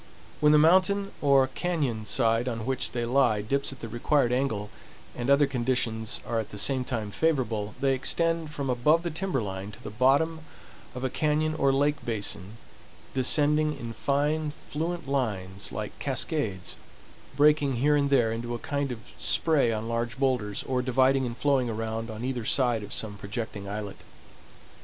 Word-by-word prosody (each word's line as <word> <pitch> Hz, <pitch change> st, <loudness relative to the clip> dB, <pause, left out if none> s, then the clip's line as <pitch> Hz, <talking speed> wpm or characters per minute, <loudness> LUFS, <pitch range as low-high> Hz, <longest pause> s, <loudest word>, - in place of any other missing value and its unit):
When 150 Hz, 0 st, +5 dB
the 150 Hz, -, +6 dB
mountain 190 Hz, +5 st, +4 dB
or 140 Hz, -2 st, +4 dB
cañon 135 Hz, -10 st, -2 dB
side 115 Hz, +1 st, +2 dB
on 115 Hz, -3 st, -3 dB
which, 130 Hz, 0 st, -2 dB
they 120 Hz, -1 st, -1 dB
lie 120 Hz, -4 st, +2 dB
dips 140 Hz, +6 st, 0 dB
at 135 Hz, -, -11 dB
the 115 Hz, -, -5 dB
required 120 Hz, +3 st, +1 dB
angle, 120 Hz, -5 st, -1 dB, 0.4 s
and 120 Hz, +2 st, -3 dB
other 140 Hz, +1 st, +5 dB
conditions 120 Hz, -4 st, -1 dB
are 115 Hz, -, -1 dB
at 110 Hz, -, -4 dB
the 105 Hz, -, -9 dB
same 130 Hz, +4 st, +2 dB
time 115 Hz, -5 st, -3 dB
favorable, 115 Hz, -9 st, -1 dB
they 135 Hz, 0 st, +2 dB
extend 165 Hz, +4 st, 0 dB
from 140 Hz, -2 st, -4 dB
above 140 Hz, +7 st, +2 dB
the 170 Hz, -, -2 dB
timber 160 Hz, -, -1 dB
line 95 Hz, 0 st, -5 dB
to -, -, -12 dB
the -, -, -6 dB
bottom 140 Hz, +8 st, +2 dB, 0.6 s
of 125 Hz, -, -5 dB
a 130 Hz, -, 0 dB
cañon 155 Hz, +1 st, +1 dB
or 140 Hz, -, +4 dB
lake 145 Hz, +2 st, +1 dB
basin, 105 Hz, -2 st, -1 dB, 0.6 s
descending 150 Hz, +3 st, +3 dB
in 115 Hz, -1 st, -6 dB
fine, 145 Hz, +4 st, 0 dB, 0.2 s
fluent 165 Hz, +1 st, -3 dB
lines 100 Hz, -8 st, -2 dB
like 105 Hz, -1 st, -4 dB
cascades, 130 Hz, -, -2 dB, 0.6 s
breaking 145 Hz, -2 st, +4 dB
here 145 Hz, +5 st, +3 dB
and 140 Hz, -1 st, +2 dB
there 120 Hz, -5 st, +3 dB
into 120 Hz, +1 st, -3 dB
a 120 Hz, -, -8 dB
kind 140 Hz, -2 st, -1 dB
of 115 Hz, -2 st, -6 dB, 0.2 s
spray 150 Hz, -8 st, +3 dB
on 110 Hz, 0 st, -3 dB
large 115 Hz, +1 st, -2 dB
boulders, 125 Hz, -7 st, 0 dB
or 130 Hz, -1 st, -1 dB
dividing 130 Hz, +1 st, +2 dB
and 120 Hz, 0 st, -6 dB
flowing 135 Hz, -4 st, +1 dB
around 115 Hz, +1 st, -3 dB
on 110 Hz, +2 st, -5 dB
either 125 Hz, -3 st, -2 dB
side 120 Hz, -1 st, +1 dB
of 105 Hz, 0 st, -9 dB
some 105 Hz, -2 st, -2 dB
projecting 100 Hz, -1 st, -5 dB
islet. 105 Hz, -1 st, -5 dB
130 Hz, 170 wpm, -27 LUFS, 115-145 Hz, 0.6 s, the